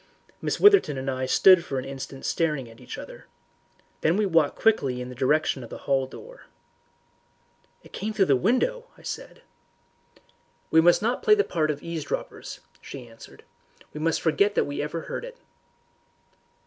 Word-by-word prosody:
Miss -, -, -2 dB
Witherton 400 Hz, -, +5 dB
and 135 Hz, +1 st, -2 dB
I 130 Hz, 0 st, -3 dB
stood 185 Hz, +5 st, +6 dB
for 135 Hz, -, -4 dB
an 130 Hz, -, -3 dB
instant 135 Hz, 0 st, -8 dB
staring 150 Hz, -7 st, -1 dB
at 115 Hz, 0 st, -15 dB
each -, -, -8 dB
other. -, -, -11 dB, 0.7 s
Then 165 Hz, +4 st, +2 dB
we 210 Hz, -, +2 dB
walked 165 Hz, -6 st, +2 dB
quickly 140 Hz, -, +1 dB
in 125 Hz, 0 st, -6 dB
the -, -, -8 dB
direction 135 Hz, +1 st, +1 dB
of 115 Hz, -, -10 dB
the -, -, -7 dB
hall 135 Hz, -1 st, +1 dB
door. -, -, -13 dB, 1.4 s
"It -, -, -18 dB
came 215 Hz, +2 st, -3 dB
through 210 Hz, -3 st, +2 dB
the 140 Hz, -, +4 dB
window," 365 Hz, -, 0 dB
I -, -, -18 dB
said. -, -, -7 dB, 1.3 s
"We 160 Hz, -, +6 dB
must 175 Hz, +4 st, +4 dB
not 240 Hz, +3 st, 0 dB
play 425 Hz, -, +5 dB
the 415 Hz, -, +2 dB
part 155 Hz, -, -1 dB
of 145 Hz, -1 st, -3 dB
eavesdroppers," 165 Hz, -3 st, -5 dB, 0.2 s
she 130 Hz, -3 st, -9 dB
answered. 115 Hz, 0 st, -15 dB, 0.5 s
"We 150 Hz, -, -6 dB
must 165 Hz, +1 st, 0 dB
forget 200 Hz, +6 st, +2 dB
that -, -, +2 dB
we 145 Hz, -, -5 dB
have 150 Hz, -, -2 dB
ever 165 Hz, -, -4 dB
heard -, -, -6 dB
it." -, -, -9 dB
155 Hz, 175 wpm, -25 LUFS, 135-205 Hz, 1.4 s, stood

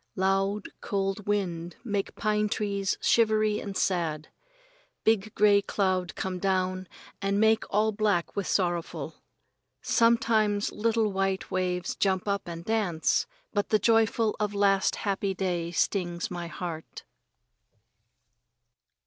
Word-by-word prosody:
Loud 195 Hz, +2 st, 0 dB
cold 195 Hz, 0 st, -2 dB
wind 175 Hz, -5 st, -2 dB
make 205 Hz, -4 st, -2 dB
pine 210 Hz, -1 st, 0 dB
trees 200 Hz, -2 st, -1 dB
shivery 215 Hz, -2 st, +3 dB
and 200 Hz, -2 st, -5 dB
sad. 160 Hz, -5 st, -1 dB, 0.7 s
Big 215 Hz, -1 st, +2 dB
gray 205 Hz, -1 st, +5 dB
cloud 185 Hz, -3 st, -1 dB
come 185 Hz, -1 st, -3 dB
down 185 Hz, -1 st, 0 dB, 0.3 s
and 200 Hz, +1 st, +1 dB
make 220 Hz, 0 st, +3 dB
all 215 Hz, +2 st, +2 dB
black 205 Hz, -5 st, 0 dB
with 200 Hz, -, -2 dB
sorrowful. 175 Hz, -3 st, -2 dB, 0.6 s
Sometimes 220 Hz, -3 st, +2 dB
little 220 Hz, 0 st, +1 dB
white 195 Hz, 0 st, -1 dB
waves 180 Hz, -1 st, -1 dB
jump 190 Hz, 0 st, 0 dB
up 200 Hz, -2 st, -1 dB
and 170 Hz, 0 st, -7 dB
dance, 200 Hz, -8 st, +1 dB, 0.3 s
but 205 Hz, -1 st, 0 dB
the 215 Hz, -, +4 dB
joyful 225 Hz, 0 st, +2 dB
of 210 Hz, -1 st, -1 dB
last 195 Hz, -1 st, +3 dB
happy 195 Hz, -1 st, -2 dB
day 175 Hz, -3 st, -1 dB
stings 175 Hz, 0 st, -1 dB
my 175 Hz, -1 st, -4 dB
heart. 170 Hz, -2 st, -7 dB
195 Hz, 120 wpm, -28 LUFS, 185-210 Hz, 0.7 s, gray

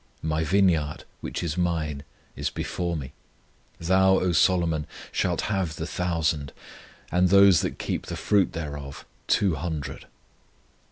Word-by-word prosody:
My 80 Hz, 0 st, 0 dB
vineyard, 80 Hz, -4 st, +2 dB, 0.2 s
which -, -, -4 dB
is 85 Hz, +1 st, -2 dB
mine, 80 Hz, -5 st, -1 dB, 0.3 s
is -, -, -2 dB
before 85 Hz, -2 st, -3 dB
me: 65 Hz, -4 st, -7 dB, 0.7 s
Thou, 95 Hz, +3 st, +4 dB
O 90 Hz, -, +1 dB
Solomon, 85 Hz, -3 st, +2 dB, 0.2 s
shalt -, -, 0 dB
have 95 Hz, -6 st, -1 dB
the 80 Hz, -, -4 dB
thousand, 80 Hz, -4 st, -1 dB, 0.6 s
And 90 Hz, +1 st, +3 dB
those 100 Hz, -2 st, +7 dB
that -, -, -3 dB
keep -, -, -3 dB
the -, -, -4 dB
fruit 100 Hz, -3 st, +2 dB
thereof 75 Hz, -4 st, -6 dB, 0.2 s
two 100 Hz, -4 st, +3 dB
hundred. 75 Hz, -3 st, -5 dB
85 Hz, 130 wpm, -26 LUFS, 75-90 Hz, 0.7 s, those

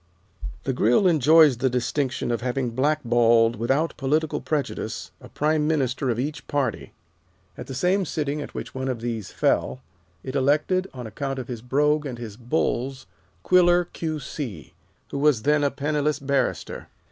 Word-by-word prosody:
The 135 Hz, -, -1 dB
Grill 125 Hz, -, +3 dB
enjoys 155 Hz, -4 st, +6 dB
the 130 Hz, +2 st, +1 dB
distinction 125 Hz, +1 st, -1 dB
of 115 Hz, -3 st, -1 dB
having 125 Hz, 0 st, -1 dB
blackballed, 120 Hz, -4 st, +3 dB
without 135 Hz, +9 st, 0 dB
political 155 Hz, +3 st, 0 dB
prejudice, 150 Hz, -3 st, -3 dB
a -, -, -12 dB
Prime 150 Hz, 0 st, +1 dB
Minister 135 Hz, -3 st, 0 dB
of 115 Hz, -, 0 dB
each 140 Hz, 0 st, -4 dB
party. 135 Hz, -6 st, -2 dB, 0.6 s
At -, -, -8 dB
the 135 Hz, -, -6 dB
same 185 Hz, +7 st, +1 dB
sitting 150 Hz, -2 st, -2 dB
at -, -, -8 dB
which -, -, -6 dB
one 130 Hz, 0 st, -3 dB
of 125 Hz, -3 st, -3 dB
these 115 Hz, -3 st, -4 dB
fell, 65 Hz, 0 st, 0 dB, 0.4 s
it 130 Hz, -, -5 dB
elected, 150 Hz, +8 st, +1 dB
on 125 Hz, -2 st, -8 dB
account 135 Hz, +4 st, -4 dB
of 130 Hz, -, -5 dB
his 120 Hz, -3 st, -6 dB
brogue 150 Hz, +4 st, +1 dB
and 125 Hz, -3 st, -6 dB
his 115 Hz, -4 st, -7 dB
bulls, 130 Hz, +1 st, -2 dB, 0.4 s
Quiller, 175 Hz, -1 st, +4 dB
Q. 160 Hz, -2 st, -3 dB
C., 120 Hz, -, -7 dB, 0.4 s
who 140 Hz, -, -3 dB
was 140 Hz, -6 st, +3 dB
then 150 Hz, 0 st, +3 dB
a 140 Hz, -, +3 dB
penniless 150 Hz, 0 st, -1 dB
barrister. 140 Hz, -1 st, -2 dB
135 Hz, 160 wpm, -24 LUFS, 120-150 Hz, 0.6 s, enjoys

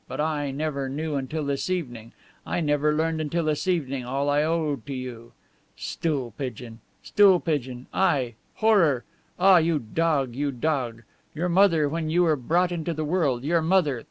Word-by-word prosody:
But -, -, -7 dB
I, 150 Hz, -1 st, 0 dB
I -, -, -3 dB
never 140 Hz, -1 st, -3 dB
knew 155 Hz, +3 st, -3 dB
until 145 Hz, +2 st, -3 dB
this 140 Hz, +4 st, -2 dB
evening; 120 Hz, -11 st, -4 dB, 0.3 s
I -, -, -2 dB
never 150 Hz, -1 st, +1 dB
learned 160 Hz, +1 st, 0 dB
until 165 Hz, +3 st, -1 dB
this 155 Hz, +4 st, -1 dB
evening 140 Hz, -8 st, -1 dB
all 135 Hz, +3 st, -1 dB
I 145 Hz, +1 st, +3 dB
owe 155 Hz, -2 st, 0 dB
to 140 Hz, +4 st, -8 dB
you. 125 Hz, -2 st, -8 dB, 0.4 s
'Stool 140 Hz, -7 st, -2 dB
pigeon! 120 Hz, -3 st, -6 dB, 0.2 s
Stool 195 Hz, -3 st, +5 dB
pigeon!' 130 Hz, -7 st, -3 dB
I! 140 Hz, -11 st, +1 dB, 0.2 s
Horror! 180 Hz, -, +3 dB, 0.3 s
Ah, 190 Hz, -1 st, +6 dB
you 165 Hz, -1 st, +2 dB
dog, 140 Hz, 0 st, 0 dB
you 145 Hz, +1 st, -1 dB
dog! 125 Hz, -4 st, -2 dB, 0.3 s
Your 175 Hz, +3 st, -1 dB
mother, 170 Hz, -4 st, +4 dB
when 160 Hz, +1 st, -3 dB
you 175 Hz, +3 st, +3 dB
were 160 Hz, -3 st, +3 dB
brought 170 Hz, +7 st, +1 dB
into 170 Hz, -1 st, -3 dB
the 155 Hz, 0 st, -2 dB
world, 145 Hz, -7 st, 0 dB
your 165 Hz, +3 st, +2 dB
mother..." 160 Hz, -6 st, +2 dB
150 Hz, 175 wpm, -25 LUFS, 135-165 Hz, 0.4 s, Ah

